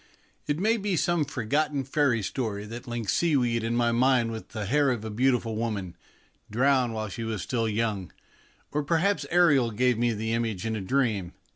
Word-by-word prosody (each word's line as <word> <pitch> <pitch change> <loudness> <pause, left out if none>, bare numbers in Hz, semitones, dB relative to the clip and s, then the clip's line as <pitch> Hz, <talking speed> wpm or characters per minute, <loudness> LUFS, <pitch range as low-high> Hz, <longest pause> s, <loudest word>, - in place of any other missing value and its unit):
It 145 - 0
may 220 +6 +2
be 200 -3 -1
some 170 -1 +1
forgotten 145 +4 -1
fairy 135 -4 +1
story 105 -2 -3
that 120 +4 -8
links 120 -4 -2
seaweed 125 -9 +1
in 115 +1 -1
my 120 -1 +2
mind 120 -1 +3
with 110 -1 -7
the 110 -2 -4
hair 140 +6 +2
of 120 -4 -2
a 110 - -4
beautiful 120 -1 +1
woman, 105 -6 -3 0.5
drowned 125 0 +2
while 110 0 -3
she 115 +3 -5
was 110 -4 -3
still 115 -3 -1
young, 105 -5 -2 0.6
or 150 - 0
perhaps 170 +7 +1
Ariel 150 -9 +4
gave 120 +1 +1
me 120 0 +2
the 110 +2 -2
image 115 -5 -2
in 110 0 -1
a 105 - -3
dream. 105 -5 0
120 Hz, 185 wpm, -27 LUFS, 110-140 Hz, 0.6 s, Ariel